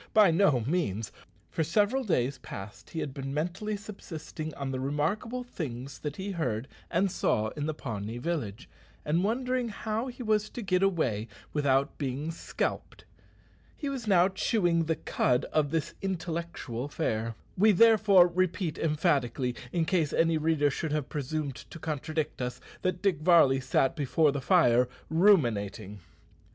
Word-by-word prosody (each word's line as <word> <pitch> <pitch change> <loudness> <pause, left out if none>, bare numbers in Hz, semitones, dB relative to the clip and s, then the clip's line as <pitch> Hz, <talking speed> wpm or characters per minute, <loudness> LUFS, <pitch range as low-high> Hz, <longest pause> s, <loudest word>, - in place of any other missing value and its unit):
By 210 -5 +7
no 160 -7 +3
means. 115 - -1 0.4
For 160 - 0
several 210 - +2
days 135 - 0
past 105 -3 -9
he 160 - -4
had 135 - -4
been 135 0 -5
mentally 180 +7 -2
subsisting 160 -6 -7
on 135 -1 -4
the 130 - -3
remarkable 165 - -1
things 135 - -6
that 150 -1 -4
he 195 +1 -4
heard 125 - -2 0.2
and 185 +2 +1
saw 110 - +1
in 145 +5 -4
the 155 - -2
Pawnee 110 -4 -5
village, 130 - -3 0.4
and 165 +4 +1
wondering 250 +3 0
how 220 +3 -3
he 250 0 -7
was 215 -1 +1
to 240 - -6
get 185 -2 +1
away 130 - +1 0.3
without 140 -1 +1
being 140 +3 -2
scalped. 165 - -4 0.7
He 285 - -3
was 260 -5 -5
now 185 -3 +5
chewing 175 -4 +1
the 160 0 +1
cud 125 -3 +1
of 150 -2 +2
this 160 -1 -2
intellectual 170 -9 -3
fare. 115 -5 -2 0.2
We 215 +4 +5
therefore 210 -3 +6
repeat 180 -2 -1
emphatically 140 -5 +1 0.2
in 170 -2 +1
case 160 -3 +1
any 165 -1 +3
reader 150 -2 +2
should 155 +2 -3
have 150 -5 -2
presumed 145 -1 -3
to - - -9
contradict 155 -2 -3
us 125 0 -3 0.2
that 185 0 -1
Dick 190 -7 +2
Varley 155 -5 +5
sat 130 +2 +1
before 150 0 +2
the 140 0 -3
fire 125 -6 +4 0.2
ruminating! 120 - +2
160 Hz, 155 wpm, -29 LUFS, 135-190 Hz, 0.7 s, By